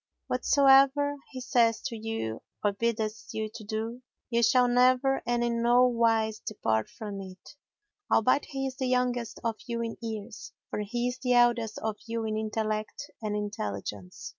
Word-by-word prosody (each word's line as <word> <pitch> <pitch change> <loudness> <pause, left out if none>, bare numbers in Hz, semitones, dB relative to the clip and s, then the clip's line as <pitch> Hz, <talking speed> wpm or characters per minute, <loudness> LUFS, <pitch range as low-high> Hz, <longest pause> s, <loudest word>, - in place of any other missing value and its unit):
Whatsoever 275 +2 +4
he 260 - -7
saith 235 -2 +2
to 250 -4 -3
you 220 - -4 0.2
or 205 -1 +2
biddeth 220 0 -2
you 220 -1 -3
to 220 - -8
do, 220 +3 -4 0.3
ye 235 0 +2
shall 245 +2 +5
never 255 +2 +3
and 240 0 +1
in 235 -1 0
no 240 +2 +5
wise 225 -3 +2
depart 110 - -1
from 205 -2 -7
it, 190 +7 -12 0.6
albeit 255 +6 +3
he 270 -1 -4
is 260 -1 -4
the 260 - -1
youngest 250 -2 0
of 225 -2 -1
you 235 -1 -2
in 230 -1 -4
years; 220 -1 -6 0.2
for - - -2
he 240 +4 -1
is 250 0 -4
the 250 -1 +1
eldest 240 -2 +3
of 220 -1 -2
you 230 0 -2
in 215 0 -1
intellect 215 0 -3
and 210 -1 -2
intelligence." 105 - -5
230 Hz, 165 wpm, -28 LUFS, 215-250 Hz, 0.6 s, shall